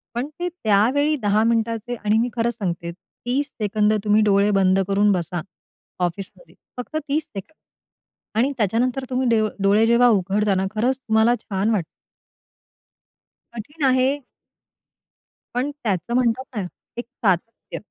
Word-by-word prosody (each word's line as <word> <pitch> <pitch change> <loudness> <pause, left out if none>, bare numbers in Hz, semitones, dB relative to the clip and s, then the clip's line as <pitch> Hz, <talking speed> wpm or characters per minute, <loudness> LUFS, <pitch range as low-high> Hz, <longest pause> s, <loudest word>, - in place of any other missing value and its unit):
पण 245 +3 -2
ते 355 - -1 0.2
त्यावेळी 245 +9 +3
10 210 +1 +2
मिनिटांचे 230 +1 0
आणि 215 -1 0
मी 235 +2 +1
खरंच 235 +1 0
सांगते, 170 -4 -3
30 250 +10 -4
सेकंद 210 +1 +2
तुम्ही 210 0 +3
डोळे 200 0 +3
बंद 190 -1 +3
करून 200 +1 +3
बसा 175 -2 -2 0.6
ऑफिसमध्ये, 190 - -7 0.2
फक्त 250 +5 -7
30 295 +2 0
सेकंद. 200 +8 -10 0.8
आणि 250 +5 +2
त्याच्यानंतर 240 +5 0
तुम्ही 255 0 0
ड 220 -1 +3 0.2
डोळे 205 +3 +4
जेव्हा 235 +1 +5
उघडता 200 0 +1
ना, 190 +1 0
खरंच 250 +5 +1
तुम्हाला 225 -1 +2
छान 195 +1 -1
वाटतं. 195 -7 0 1.7
कठीण 290 +8 -7
आहे. 260 +2 +2 1.3
पण 260 +4 0
त्याचं 195 -1 -1
म्हणतात 245 0 +1
ना 205 -4 -2 0.3
एक 240 - -4
सातत्य. 225 -3 -2
220 Hz, 135 wpm, -22 LUFS, 200-245 Hz, 1.7 s, जेव्हा